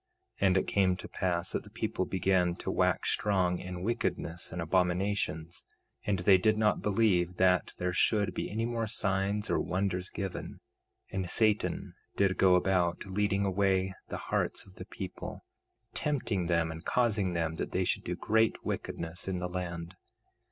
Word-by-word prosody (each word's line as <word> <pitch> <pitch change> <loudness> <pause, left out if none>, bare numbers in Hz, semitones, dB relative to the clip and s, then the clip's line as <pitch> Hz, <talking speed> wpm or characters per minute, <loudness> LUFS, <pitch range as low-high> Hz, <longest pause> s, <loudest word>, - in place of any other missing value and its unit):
2:3 100 - +5
And 95 0 +4
it - - +2
came 95 -2 +3
to 90 - -8
pass 90 -1 -1
that - - -2
the 105 - -13
people 110 -4 -2
began 90 -2 +2
to - - -4
wax - - +2
strong 95 -4 +1
in 90 -1 -6
wickedness 90 -6 -2
and 90 - -5
abominations; 90 -1 0 0.4
and 100 -2 +2
they 95 +1 +5
did 110 +3 +3
not 105 -1 +2
believe 95 -5 +2
that 90 -2 +3
there 90 0 -1
should 100 +1 +2
be - - -3
any 110 +2 -1
more 115 -1 -1
signs 100 0 0
or - - +2
wonders 95 0 -1
given; 95 -3 -5 0.5
and 95 -2 -2
Satan 110 0 +1 0.2
did 95 -2 +2
go 95 -1 +6
about, 90 -1 +1
leading 100 +1 0
away 95 -1 +1
the - - -4
hearts - - -2
of 95 - -16
the - - -7
people, - - -7 0.5
tempting 115 - -1
them 85 -1 +1
and 80 +1 -8
causing 105 -7 +1
them 80 -1 -1
that - - -3
they - - +1
should - - 0
do - - -3
great 110 +1 +1
wickedness 85 +3 -4
in 95 -1 -1
the 90 0 -2
land. 85 -1 -5
95 Hz, 170 wpm, -31 LUFS, 90-100 Hz, 0.5 s, go